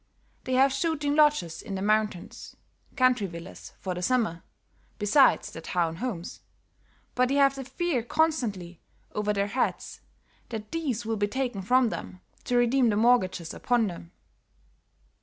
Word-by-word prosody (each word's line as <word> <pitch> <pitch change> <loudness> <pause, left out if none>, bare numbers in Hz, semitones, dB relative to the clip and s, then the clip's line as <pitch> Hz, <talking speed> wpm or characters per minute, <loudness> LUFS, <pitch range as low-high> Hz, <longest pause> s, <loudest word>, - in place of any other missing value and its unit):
They 260 - -2
have 265 +2 +5
shooting 295 0 0
lodges 295 - +2
in 195 - -6
the 190 - -4
mountains, 215 -3 -1 0.4
country 255 -5 +3
villas 170 +1 -10
for 185 - -3
the 180 - -5
summer, 215 -5 0 0.6
besides 225 +7 +3
their 165 - -8
town 165 -1 -1
homes, 195 -6 -5 0.7
but 250 0 +2
they 275 - +1
have 275 -1 +5
the 270 -1 -6
fear 310 0 -1
constantly 225 - -1 0.3
over 210 0 0
their 200 -1 0
heads 225 +6 -2 0.5
that 215 -2 -6
these 270 -9 -2
will 225 0 -1
be 205 0 +1
taken 245 -3 -3
from 250 +5 +3
them, 90 - -7 0.3
to 245 - +1
redeem 245 +1 +3
the 210 - +1
mortgages 205 -7 +2
upon 245 -2 +1
them." 175 -3 -7
225 Hz, 150 wpm, -27 LUFS, 190-260 Hz, 0.7 s, have